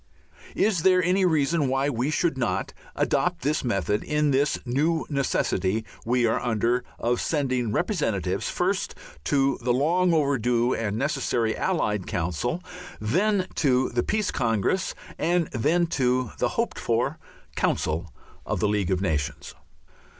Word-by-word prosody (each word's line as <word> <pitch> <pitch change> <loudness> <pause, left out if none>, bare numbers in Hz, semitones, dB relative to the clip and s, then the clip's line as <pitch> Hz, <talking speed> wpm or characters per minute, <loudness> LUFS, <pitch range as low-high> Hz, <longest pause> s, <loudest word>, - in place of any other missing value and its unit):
Is 200 -5 +2
there 185 +1 +4
any 185 +2 +3
reason 155 -2 +2
why 135 +2 +1
we 130 0 -1
should, 160 0 +1
not 100 -7 -1 0.2
adopt - - 0
this 150 +3 0
method 105 - 0
in 150 -1 +1
this 140 +2 +2
new 155 +6 +1
necessity 110 -6 0 0.2
we 120 0 +3
are 115 - +2
under 120 +1 0
of 120 +1 0
sending 130 -7 0
representatives, - - -1
first, - - -1 0.3
to 135 - +2
the 120 +1 +1
long 170 +8 +2
overdue 125 -6 +2
and 110 -2 -2
necessary 120 -4 0
Allied 105 - -1
Council, 90 - -2 0.4
then 185 - +1
to 130 -4 +2
the 120 0 0
Peace 215 - 0
Congress, 115 - 0 0.2
and 175 -1 +1
then 155 +9 +2
to 130 -6 0
the - - +2
hoped - - -1
for - - 0 0.4
Council 80 +1 -1 0.3
of - - -2
the 105 - +2
League 105 -3 0
of 95 -1 +1
Nations? 75 -5 -2
130 Hz, 140 wpm, -25 LUFS, 110-155 Hz, 0.4 s, there